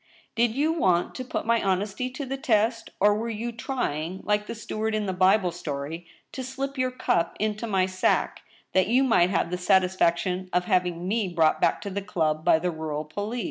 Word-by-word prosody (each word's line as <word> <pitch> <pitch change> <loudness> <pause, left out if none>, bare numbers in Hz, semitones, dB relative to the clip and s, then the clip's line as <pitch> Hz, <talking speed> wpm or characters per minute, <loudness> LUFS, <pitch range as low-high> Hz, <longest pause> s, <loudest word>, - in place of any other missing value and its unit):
Did 235 -1 +1
you 305 +4 +2
want 180 - +1
to 255 - -5
put 255 - -4
my 230 0 +2
honesty 200 +5 -1
to 265 +2 -6
the 270 +1 -3
test; 230 -4 +1
or 205 +1 +5
were 225 +3 -2
you 230 +2 -3
trying, 190 - -3
like 210 0 0
the - - -5
steward 220 0 -3
in 215 -1 -1
the 190 - -2
Bible 185 0 +3
story, 165 0 -5 0.2
to 260 - -5
slip 270 +2 -4
your 255 -1 0
cup 170 -9 0
into 215 +2 -1
my 190 -3 +2
sack, 185 0 0 0.3
that 185 0 +3
you 250 +5 +3
might 185 -9 +4
have 170 -2 0
the 180 - -2
satisfaction 185 0 +2
of 180 0 +2
having 180 -2 0
me 215 0 0
brought 165 -3 +2
back - - +2
to 200 - -5
the 200 +2 -3
club 160 -6 -1
by - - +5
the 175 +2 -1
rural 155 -2 -4
police 205 +9 -4
195 Hz, 205 wpm, -26 LUFS, 180-230 Hz, 0.3 s, or